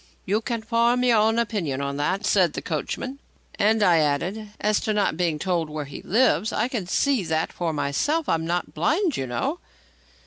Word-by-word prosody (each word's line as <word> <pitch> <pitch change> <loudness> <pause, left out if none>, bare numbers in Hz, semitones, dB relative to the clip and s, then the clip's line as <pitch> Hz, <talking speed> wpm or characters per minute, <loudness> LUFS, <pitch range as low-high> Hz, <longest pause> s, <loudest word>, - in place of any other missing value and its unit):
"You 210 +4 +1
can 230 0 -3
form 235 +2 +2
your 240 -3 +4
own 220 +2 +3
opinion 200 - -1
on 140 0 -3
that," 185 +8 -1
said 185 -6 +3
the - - -4
coachman. 255 - -4 0.4
"And," 215 +1 +3
I 175 -4 +5
added, 175 +9 -1
"as 210 0 +2
to 215 - -1
not 205 -6 +1
being 170 -2 0
told 170 -2 -1
where 150 -1 -4
he 140 - -9
lives, 220 +1 +2
I - - 0
can 220 -9 -3
see 270 +2 +1
that 160 0 -1
for 170 -2 -2
myself. 160 - 0
I'm 160 0 +1
not 175 0 -2
blind, 315 - +1
you 130 - -3
know." 275 - -2
200 Hz, 195 wpm, -24 LUFS, 160-230 Hz, 0.4 s, I